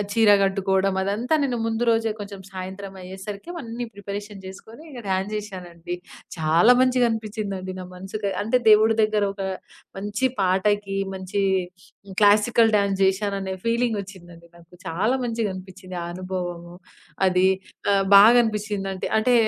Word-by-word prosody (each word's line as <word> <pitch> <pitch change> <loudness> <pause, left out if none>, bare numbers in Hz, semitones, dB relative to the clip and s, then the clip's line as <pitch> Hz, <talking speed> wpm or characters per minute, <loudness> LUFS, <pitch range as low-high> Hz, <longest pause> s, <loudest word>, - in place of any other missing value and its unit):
చీర 225 -2 +5 0.2
గట్టుకోడం 195 0 +1
అదంతా 210 +8 -1
నేను 245 -3 -2
ముందు 225 +1 -1
రోజే 225 -1 +1
కొంచెం 200 -1 -8
సాయంత్రమయ్యేసరికి 190 +1 -7 0.2
అన్నీ 235 +1 -5
ప్రిపరేషన్ 205 0 -7
జేసుకోనీ, 220 +8 -11
ఇక 255 -5 -9
డాన్స్ 190 +2 -1
జేషానండి. 175 -4 -7 0.4
చాలా 165 +7 +4
మంచిగా 255 -1 +3
అనిపిచ్చిందండి 210 -4 -4
నా - - -6
మనసుకి. 200 +2 -4
అంటే, 225 +4 +2
దేవుడి 220 +1 +6
దగ్గర 215 -1 +2
ఒక 200 - -8 0.6
మంచి 205 +5 -2
పాటకి, 195 +2 +1 0.2
మంచీ 190 +1 -3 0.8
క్లాసికల్ 215 +2 +5
డాన్స్ 200 -1 +1
జేషాననే 195 0 0
ఫీలింగొచ్చిందండి 200 -8 -3
నాకు. 170 -1 -19 0.2
చాలా 200 +10 +1
మంచిగనిపిచ్చింది 190 -5 -4
ఆ - - -5
అనుభవము, 175 -1 -5 0.5
అదీ 185 0 +3 0.5
ఆహ్, 195 -1 +2
బాగనిపిచ్చిందంటి. 210 -3 +4
అంటే, 245 +3 +2
200 Hz, 120 wpm, -23 LUFS, 190-220 Hz, 0.8 s, దేవుడి